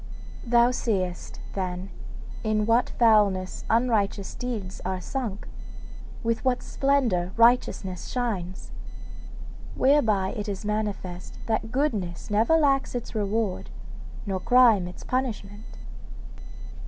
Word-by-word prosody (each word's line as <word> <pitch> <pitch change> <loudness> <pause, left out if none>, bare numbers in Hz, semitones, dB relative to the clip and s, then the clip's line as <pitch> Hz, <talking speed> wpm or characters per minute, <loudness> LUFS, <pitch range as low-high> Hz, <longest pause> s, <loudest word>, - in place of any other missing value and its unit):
'Thou 240 +1 +4
seest, 190 -8 -2
then, 185 0 -3 0.5
in 215 -1 +1
what 230 +2 +3
foulness 205 -5 +3
unrighteous 220 -4 +1
deeds 225 -7 -5
are 185 0 -2
sunk, 220 -1 -4 0.8
with 230 0 0
what 255 -1 +1
splendour 235 -11 +1
righteousness 230 -6 +2
shines. 200 -8 -3 1.0
Whereby 220 -9 +3
it 210 +1 -4
is 200 +1 -5
manifest 205 -4 -3
that 220 0 -1
goodness 215 - -1
never 225 +10 +4
lacks 275 -4 +2
its 240 - -5
reward, 210 -2 -1 0.6
nor 195 -2 -2
crime 230 -4 +5
its 180 - -10
punishment. 220 -5 -4
215 Hz, 105 wpm, -26 LUFS, 190-245 Hz, 1.0 s, crime